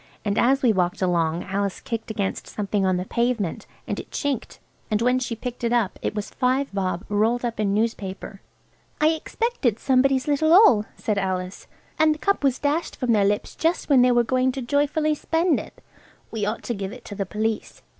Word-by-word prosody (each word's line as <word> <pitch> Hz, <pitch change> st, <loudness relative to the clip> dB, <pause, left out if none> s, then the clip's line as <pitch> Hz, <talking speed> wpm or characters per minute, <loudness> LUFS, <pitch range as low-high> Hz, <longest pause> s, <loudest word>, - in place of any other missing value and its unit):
And 200 Hz, -1 st, 0 dB
as 270 Hz, +3 st, +3 dB
we 235 Hz, -3 st, +5 dB
walked 180 Hz, 0 st, 0 dB
along 170 Hz, -2 st, +1 dB
Alice 200 Hz, 0 st, -2 dB
kicked 230 Hz, -1 st, -5 dB
against 205 Hz, -3 st, -3 dB
something 200 Hz, -2 st, -1 dB
on 185 Hz, -1 st, +2 dB
the 180 Hz, -, -3 dB
pavement, 235 Hz, -6 st, -1 dB, 0.2 s
and -, -, -2 dB
it -, -, -9 dB
chinked, 280 Hz, -5 st, -3 dB, 0.3 s
and 210 Hz, -, +1 dB
when 250 Hz, +2 st, +2 dB
she 245 Hz, -2 st, -3 dB
picked 245 Hz, +1 st, -6 dB
it 235 Hz, -, +1 dB
up 235 Hz, -6 st, 0 dB
it -, -, -2 dB
was 210 Hz, -1 st, -4 dB
five 260 Hz, -1 st, 0 dB
bob 185 Hz, -1 st, -2 dB
rolled 225 Hz, +4 st, +1 dB
up 230 Hz, -2 st, -4 dB
in 205 Hz, -2 st, +1 dB
newspaper. 205 Hz, -3 st, -3 dB, 0.6 s
"I 305 Hz, -, +4 dB
expect 460 Hz, +9 st, -2 dB
it's 230 Hz, -4 st, +1 dB
somebody's 265 Hz, 0 st, +3 dB
little 315 Hz, +2 st, +3 dB
all," 245 Hz, -, +7 dB
said 210 Hz, -2 st, -1 dB
Alice, 185 Hz, -1 st, -3 dB, 0.3 s
"and 310 Hz, -1 st, +4 dB
the -, -, -10 dB
cup 400 Hz, 0 st, 0 dB
was 265 Hz, -2 st, +2 dB
dashed 300 Hz, +3 st, -1 dB
from 250 Hz, -3 st, -1 dB
their 210 Hz, -3 st, +4 dB
lips 205 Hz, +1 st, 0 dB
just 330 Hz, +1 st, 0 dB
when 270 Hz, -3 st, +6 dB
they 250 Hz, 0 st, +5 dB
were 240 Hz, 0 st, +4 dB
going 255 Hz, +2 st, +1 dB
to 270 Hz, -, -4 dB
joyfully 290 Hz, +4 st, +1 dB
spend 325 Hz, +2 st, +1 dB
it. -, -, -12 dB, 0.5 s
We 215 Hz, -2 st, -2 dB
ought 215 Hz, -, -3 dB
to 240 Hz, -, -2 dB
give 195 Hz, -2 st, -4 dB
it 250 Hz, -, -11 dB
to -, -, -7 dB
the 195 Hz, -1 st, -3 dB
police." 215 Hz, +2 st, -3 dB
235 Hz, 205 wpm, -24 LUFS, 200-270 Hz, 0.6 s, all